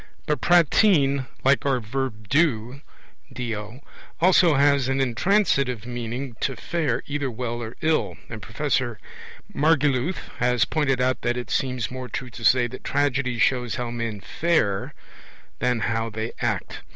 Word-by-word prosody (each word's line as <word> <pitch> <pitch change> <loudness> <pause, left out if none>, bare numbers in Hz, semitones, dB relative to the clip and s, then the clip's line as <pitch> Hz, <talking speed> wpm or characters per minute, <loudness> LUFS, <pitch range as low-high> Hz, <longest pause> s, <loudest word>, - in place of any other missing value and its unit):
But 150 -5 -1
prattein, 150 -5 +4 0.2
like 135 +1 +3
our 135 -2 +1
'do', 125 - -1 1.4
also 175 -2 +5
has 140 -1 +3
an 135 0 0
intransitive 135 - +1
meaning 120 +1 -5
'to 135 - -1
fare' 165 +6 -2
either 140 -1 -2
well 120 0 -4
or 115 +1 -6
ill; 155 0 0
and 110 -2 -8
Professor 125 0 -1 0.6
Margoliouth 145 +1 +1
has 125 0 +2
pointed 135 -5 0
out 125 -1 +1
that 120 0 0
it 125 - -5
seems 125 -3 -1
more 130 0 -6
true 125 +3 -5
to 115 - -10
say 125 +2 +5
that 130 +2 -8
tragedy 140 -3 0
shows 125 0 +1
how 125 -2 -3
men 115 -4 -4
'fare' 155 - 0 0.6
than 125 -2 +1
how 115 0 -1
they 110 +1 -4
'act'. - - -2
130 Hz, 140 wpm, -24 LUFS, 120-140 Hz, 1.4 s, also